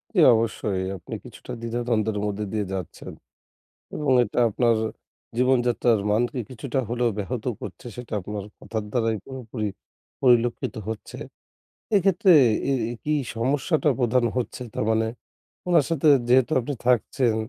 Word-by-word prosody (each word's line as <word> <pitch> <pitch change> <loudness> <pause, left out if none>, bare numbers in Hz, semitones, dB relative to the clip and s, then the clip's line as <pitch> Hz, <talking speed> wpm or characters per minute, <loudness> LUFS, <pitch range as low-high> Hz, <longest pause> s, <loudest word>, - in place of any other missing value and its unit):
জি - - +4
অবশ্যই, 110 -4 0 0.2
আপনি - - -10
কিছুটা - - -11
দ্বিধা-দ্বন্দ্বের 115 -2 -1
মধ্যে 105 0 -2
দিয়ে 105 -2 0
যাচ্ছেন 95 -3 -6 0.8
এবং 150 -3 0
এটা 115 - -2
আপনার 115 +2 +2 0.6
জীবনযাত্রার 120 -3 +3
মানকে 120 +5 +1
কিছুটা 130 +2 -3
হলেও 120 0 +1
ব্যাহত 110 +3 -3 0.2
করছে 95 +1 -8
সেটা 120 -2 -8
আপনার 105 +1 -5
কথার 110 -2 -4
দ্বারাই 115 -2 +1
পুরোপুরি 120 -4 -5 0.5
পরিলক্ষিত 120 -2 +2
হচ্ছে। 110 - -6 0.8
এক্ষেত্রে 195 +1 +4 0.4
এ - - +3 0.2
এ - - -3
কী 150 - 0 0.2
সমস্যাটা 145 +7 +1
প্রধান 125 0 +2
হচ্ছে 125 0 -3
তার - - -1
মানে 110 0 +2 0.6
ওনার 165 -5 +5
সাথে 160 -1 +2 0.2
যেহেতু 130 +4 +4
আপনি 135 +4 -4
থাকছেন 125 -1 +2
120 Hz, 130 wpm, -24 LUFS, 110-130 Hz, 0.8 s, ওনার